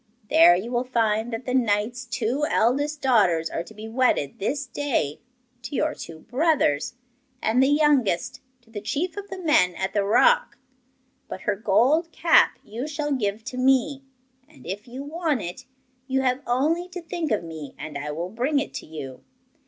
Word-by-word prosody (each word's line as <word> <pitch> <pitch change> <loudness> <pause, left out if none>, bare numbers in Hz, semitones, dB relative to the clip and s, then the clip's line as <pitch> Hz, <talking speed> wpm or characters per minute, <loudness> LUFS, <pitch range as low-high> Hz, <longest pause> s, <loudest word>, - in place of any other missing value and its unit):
There 315 - +7
you 205 +7 -4
will 245 0 +1
find 230 -2 0
that 225 +2 -5
the 250 - -2
knight's 235 +1 0
two 250 +4 -2
eldest 285 +6 +1
daughters 185 -11 +3
are - - -2
to 195 - -11
be 215 +1 -8
wedded 225 - +1
this 275 +8 -1
day 245 - -2 0.4
to 285 - -6
your 305 +2 +1
two 160 - -10
brothers, 255 - +1 0.4
and 230 +3 +2
the 265 - +5
youngest 285 - +2 0.2
to 225 - -24
the 210 -2 -6
chief 320 - -2
of 405 0 -7
the 380 - -6
men 300 - +3
at 190 0 -3
the 205 - +2
rock. 485 - +3 0.7
But - - -7
her - - 0
gold 260 - +2
cap 335 -1 +4
you 235 +7 -5
shall 295 -1 -3
give 215 -5 -1
to 250 +1 -7
me 270 +2 +2 0.5
and, 310 - -18
if 200 +5 -6
you 255 +3 -7
want 305 -3 -1
it, 175 +8 -7 0.4
you 265 0 +1
have 255 0 0
only 310 +9 +1
to 360 0 -7
think 330 -1 -3
of 210 - +1
me 160 -4 -8
and 155 0 -7
I 145 +1 -4
will 165 +4 -4
bring 255 +8 0
it 280 - -2
to - - -7
you. 135 -5 -8
250 Hz, 185 wpm, -24 LUFS, 205-290 Hz, 0.7 s, There